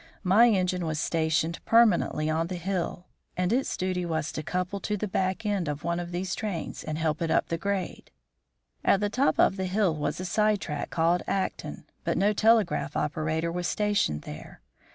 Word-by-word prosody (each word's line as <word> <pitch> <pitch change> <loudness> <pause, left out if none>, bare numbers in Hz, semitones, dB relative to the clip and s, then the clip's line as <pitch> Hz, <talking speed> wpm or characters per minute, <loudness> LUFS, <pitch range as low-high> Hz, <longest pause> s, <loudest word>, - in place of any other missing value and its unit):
My 210 +6 +6
engine 185 -3 +1
was 155 -1 -2
stationed 160 0 0
permanently 210 -9 +3
on 160 +1 0
the 180 - -4
hill, 180 0 -3 0.3
and 180 +3 +1
its 265 +2 0
duty 185 -1 -1
was 160 -3 -2
to - - -4
couple 180 +5 -2
to 210 +2 -2
the 210 - -2
back 190 +3 -1
end 200 -5 0
of 145 0 -4
one 170 +1 -1
of 175 0 -5
these 180 +1 -2
trains 200 -7 -4
and 155 - -4
help 160 -1 -1
it 165 - 0
up 160 - +2
the 165 - -1
grade. 200 -2 -3 0.7
At 195 - +4
the 205 0 -1
top 265 +5 +2
of 195 - +4
the 190 - -1
hill 190 -3 +1
was 150 +2 -2
a 185 - -4
side 210 +2 +2
track 150 -5 -4
called 170 +1 +2
Acton, 195 -1 -3 0.2
but - - 0
no 205 +2 +3
telegraph 210 -10 +2
operator 155 +2 -1
was 175 +1 -2
stationed 205 - 0
there. 75 -4 -10
180 Hz, 195 wpm, -27 LUFS, 160-200 Hz, 0.7 s, My